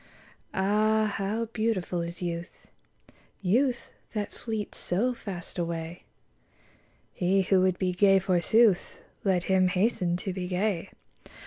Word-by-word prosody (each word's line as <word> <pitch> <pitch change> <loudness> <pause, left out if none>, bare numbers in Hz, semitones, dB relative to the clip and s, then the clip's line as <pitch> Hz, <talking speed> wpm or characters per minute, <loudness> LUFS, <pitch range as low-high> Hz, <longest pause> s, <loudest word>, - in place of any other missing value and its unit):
AH, 215 +3 +2
how 210 +4 -1
beautiful 210 -6 -1
is 170 +1 -5
youth, 170 0 -3 0.9
Youth 240 +6 +1 0.2
that 210 -2 -3
fleets 220 -3 -4
so 230 +8 0
fast 190 -6 -7
away 170 0 -4 1.1
1 180 - +1
He 195 +1 +4
who 190 0 +3
would 185 -1 +2
be 185 -1 0
gay, 195 +1 +5
forsooth. 190 +3 +3 0.2
Let 185 -3 +2
him 190 0 +3
hasten 180 -2 +1
to 185 +1 -4
be 180 -1 -4
gay 185 -1 -1
190 Hz, 125 wpm, -28 LUFS, 180-215 Hz, 1.1 s, gay